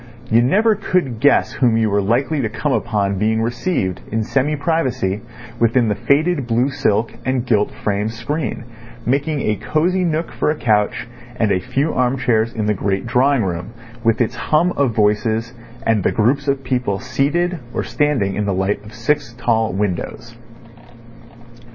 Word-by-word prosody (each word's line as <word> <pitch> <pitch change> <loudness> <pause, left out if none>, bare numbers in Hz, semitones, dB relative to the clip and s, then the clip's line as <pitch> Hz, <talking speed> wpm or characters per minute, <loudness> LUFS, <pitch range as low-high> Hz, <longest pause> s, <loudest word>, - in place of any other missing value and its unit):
You 115 +1 +5
never 210 - +3
could 185 - -1
guess 145 +2 +3
whom 120 -4 +2
you 110 -2 +1
were 100 0 +2
likely 130 +9 +1
to 110 - -1
come 145 +6 -2
upon 100 -6 0
being 110 +2 +1
received 115 - -1
in 110 +1 0
semi 135 +6 0
privacy 130 - -1 0.4
within 115 0 +3
the - - +2
faded 145 - +1
blue 120 +3 +2
silk 115 -5 0
and 130 -1 -1
gilt 105 -4 +2
frame 105 +1 -2
screen, 120 +3 -3 0.4
making 140 +3 0
a 105 -1 0
cosy 180 - 0
nook 165 -1 -1
for - - -1
a 155 - +1
couch 105 -5 0 0.3
and 110 -4 +1
a 95 - +2
few 140 - -1
arm 125 +1 +1
chairs 115 -3 +1
in 110 -2 -3
the 105 - +2
great 95 +1 -1
drawing 125 +1 +2
room, 90 +3 -4 0.3
with 115 +1 +2
its 120 +1 +1
hum 155 +8 +2
of 135 -9 0
voices 110 +2 +1 0.3
and 115 -2 +2
the - - +1
groups 135 +6 +1
of 135 -1 0
people 125 -6 -1
seated 145 - 0
or - - -2
standing 135 -10 0
in 105 0 -2
the 100 - 0
light 95 +3 -1
of 105 +3 -12
six 130 +1 -1
tall 115 -3 +1
windows. 105 +4 -3
120 Hz, 170 wpm, -19 LUFS, 105-140 Hz, 0.4 s, You